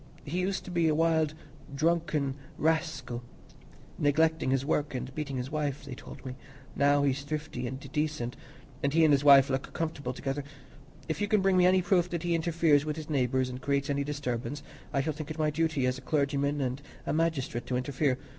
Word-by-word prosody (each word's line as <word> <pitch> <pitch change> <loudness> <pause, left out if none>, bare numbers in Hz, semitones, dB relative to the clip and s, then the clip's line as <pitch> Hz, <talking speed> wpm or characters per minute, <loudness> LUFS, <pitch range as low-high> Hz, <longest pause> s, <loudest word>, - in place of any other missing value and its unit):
He 165 +5 -2
used 190 +1 -1
to 180 - -7
be 170 -2 +2
a 155 - +3
wild 160 -1 +2 0.4
drunken 155 -3 +1 0.2
rascal, 155 -6 0 0.8
neglecting 160 0 +2
his 135 0 +1
work 145 -2 0
and 125 +1 -4
beating 140 -2 -3
his 125 +3 -4
wife, 145 -2 -2
they 140 - -6
told 130 - -11
me; 130 -1 -5 0.4
now 145 0 +4
he's 140 0 +1
thrifty 145 -4 -4
and 130 +2 -5
decent, 150 -5 -1 0.5
and 140 0 0
he 165 - +6
and 155 - +5
his 140 0 +3
wife 140 -2 +8
look 130 0 -2
comfortable 155 -6 -3
together. 135 +2 -3 0.6
If 160 +5 -3
you 205 - +1
can 210 0 +3
bring 190 0 +3
me 180 0 +6
any 185 0 +4
proof 180 -1 +2
that 170 -1 -3
he 175 -1 +1
interferes 165 -3 +3
with 150 0 -2
his 155 -1 -7
neighbours 130 -2 +1
and 125 0 -6
creates 140 +1 0
any 140 0 0
disturbance, 140 -1 -3 0.3
I 140 - +1
shall 155 +3 -1
think 155 +1 -7
it 155 - -5
my 155 -1 +1
duty 155 -3 +1
as 130 +1 0
a - - -13
clergyman 140 0 0
and 130 +1 -2 0.2
a - - -1
magistrate 155 -7 -1
to 125 - 0
interfere. 130 +1 0
145 Hz, 200 wpm, -29 LUFS, 135-160 Hz, 0.8 s, wife